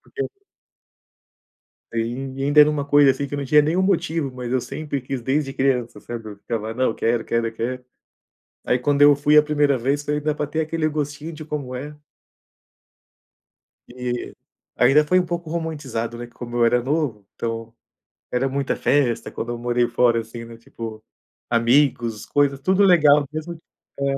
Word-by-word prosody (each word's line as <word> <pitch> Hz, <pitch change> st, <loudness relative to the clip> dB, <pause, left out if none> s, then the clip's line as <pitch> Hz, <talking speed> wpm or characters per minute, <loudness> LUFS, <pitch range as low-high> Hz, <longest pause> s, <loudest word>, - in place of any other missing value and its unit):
porque 415 Hz, -, -1 dB, 1.7 s
É, -, -, -3 dB
e -, -, +1 dB
ain 130 Hz, +3 st, -5 dB
ainda 145 Hz, +1 st, +4 dB
era 150 Hz, 0 st, +8 dB
uma 150 Hz, -2 st, -1 dB
coisa, 145 Hz, -1 st, +5 dB
assim, 140 Hz, +1 st, -4 dB
que -, -, -10 dB
eu -, -, -4 dB
não 140 Hz, -, -3 dB
tinha 150 Hz, +3 st, +5 dB
nenhum 160 Hz, +5 st, +1 dB
motivo, 165 Hz, -6 st, 0 dB
mas 125 Hz, -1 st, -6 dB
eu 130 Hz, -, +2 dB
sempre 140 Hz, +3 st, -4 dB
quis 130 Hz, 0 st, -4 dB
desde 135 Hz, +2 st, -1 dB
criança 125 Hz, -5 st, 0 dB
sabe, 115 Hz, -1 st, -7 dB
eu 105 Hz, -, -10 dB
ficava: 110 Hz, +1 st, -4 dB
"Não, 130 Hz, -1 st, +1 dB
quero, 115 Hz, 0 st, 0 dB
quero, 115 Hz, 0 st, -1 dB
quero." 125 Hz, +3 st, -4 dB, 0.8 s
Aí, 125 Hz, -, +2 dB
quando 140 Hz, +3 st, +1 dB
eu 145 Hz, 0 st, +8 dB
fui 145 Hz, +2 st, +3 dB
a 150 Hz, -, +8 dB
primeira 145 Hz, -2 st, +2 dB
vez, 140 Hz, +4 st, -1 dB
falei: 150 Hz, 0 st, -1 dB
"Dá 150 Hz, +1 st, 0 dB
para 150 Hz, 0 st, -3 dB
ter 160 Hz, -, -1 dB
aquele 160 Hz, 0 st, -1 dB
gostinho 150 Hz, +1 st, -4 dB
de 155 Hz, 0 st, -8 dB
como 145 Hz, -4 st, -5 dB
é." 145 Hz, +4 st, -7 dB, 1.9 s
E, 125 Hz, 0 st, -5 dB, 0.4 s
ainda, 135 Hz, +5 st, +5 dB
foi 185 Hz, +4 st, +3 dB
um 180 Hz, -, 0 dB
pouco 170 Hz, -2 st, -4 dB
romantizado, 145 Hz, -9 st, -4 dB
né, 120 Hz, -, -6 dB
como 120 Hz, 0 st, -9 dB
eu 120 Hz, -, +4 dB
era 120 Hz, +1 st, +3 dB
novo, 130 Hz, -6 st, -2 dB
então, 115 Hz, -1 st, -4 dB, 0.6 s
era 130 Hz, +2 st, 0 dB
muita 140 Hz, +1 st, -1 dB
festa 135 Hz, -5 st, +1 dB
quando 120 Hz, -, -5 dB
eu 120 Hz, -, -4 dB
morei 120 Hz, 0 st, +1 dB
fora 120 Hz, -1 st, +2 dB
assim 115 Hz, +1 st, -8 dB
né, 115 Hz, 0 st, -11 dB
tipo, 115 Hz, -1 st, -8 dB, 0.5 s
amigos, 120 Hz, -2 st, +2 dB
coisas, 140 Hz, -1 st, +1 dB
tudo 190 Hz, +7 st, +2 dB
legal 150 Hz, -6 st, +5 dB
mesmo 160 Hz, +2 st, -5 dB, 0.4 s
É. -, -, -1 dB
135 Hz, 180 wpm, -22 LUFS, 120-150 Hz, 1.9 s, era